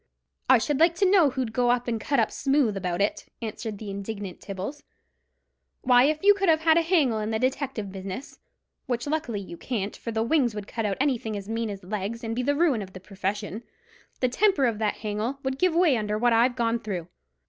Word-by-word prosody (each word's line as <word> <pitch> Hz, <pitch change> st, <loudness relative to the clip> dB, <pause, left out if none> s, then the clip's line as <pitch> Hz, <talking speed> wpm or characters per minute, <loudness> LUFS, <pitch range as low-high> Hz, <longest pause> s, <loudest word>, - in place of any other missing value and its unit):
"I 260 Hz, -, +8 dB
should 270 Hz, +4 st, -1 dB
like 335 Hz, +1 st, +5 dB
to 390 Hz, -, +2 dB
know 370 Hz, -6 st, +5 dB
who'd 255 Hz, -4 st, -3 dB
go 245 Hz, +1 st, +2 dB
and 240 Hz, -2 st, 0 dB
cut 280 Hz, +2 st, +1 dB
up 225 Hz, -, +2 dB
smooth 270 Hz, -6 st, +1 dB
about 180 Hz, -1 st, -2 dB
it?" 205 Hz, -, -1 dB
answered 220 Hz, -1 st, -5 dB
the 205 Hz, -1 st, -7 dB
indignant 200 Hz, -1 st, -6 dB
Tibbles. 200 Hz, +9 st, -6 dB, 1.0 s
"Why, 250 Hz, 0 st, +6 dB
if 310 Hz, +3 st, 0 dB
you 410 Hz, +1 st, +8 dB
could 390 Hz, -3 st, 0 dB
have 320 Hz, 0 st, +3 dB
a 325 Hz, +1 st, +6 dB
hangel 315 Hz, -10 st, +2 dB
in 215 Hz, 0 st, -2 dB
the 220 Hz, -, 0 dB
detective 255 Hz, -4 st, -2 dB
business—which 230 Hz, +4 st, -7 dB
luckily 290 Hz, -9 st, -2 dB
you 175 Hz, -3 st, -9 dB
can't, 210 Hz, -3 st, -3 dB
for 230 Hz, -, -6 dB
the 220 Hz, 0 st, 0 dB
wings 240 Hz, -3 st, +2 dB
would 210 Hz, -1 st, -5 dB
cut 225 Hz, +1 st, -3 dB
out 195 Hz, -, -2 dB
anything 240 Hz, -6 st, 0 dB
as 200 Hz, -1 st, -8 dB
mean 225 Hz, 0 st, -2 dB
as 195 Hz, -2 st, -7 dB
legs, 210 Hz, +4 st, -4 dB
and 225 Hz, 0 st, -3 dB
be 250 Hz, -, 0 dB
the 285 Hz, +3 st, +1 dB
ruin 290 Hz, -8 st, +2 dB
of 190 Hz, -1 st, -9 dB
the 185 Hz, -, -8 dB
purfession—the 210 Hz, -, -5 dB
temper 340 Hz, +1 st, +3 dB
of 225 Hz, -3 st, 0 dB
that 215 Hz, -2 st, 0 dB
hangel 215 Hz, +5 st, -3 dB
would 265 Hz, 0 st, -2 dB
give 365 Hz, -3 st, +2 dB
way 340 Hz, -6 st, +4 dB
under 210 Hz, -2 st, -1 dB
what 240 Hz, +1 st, +3 dB
I've 240 Hz, +2 st, +3 dB
gone 235 Hz, -1 st, 0 dB
through. 190 Hz, -7 st, -5 dB
235 Hz, 210 wpm, -26 LUFS, 210-280 Hz, 1.0 s, I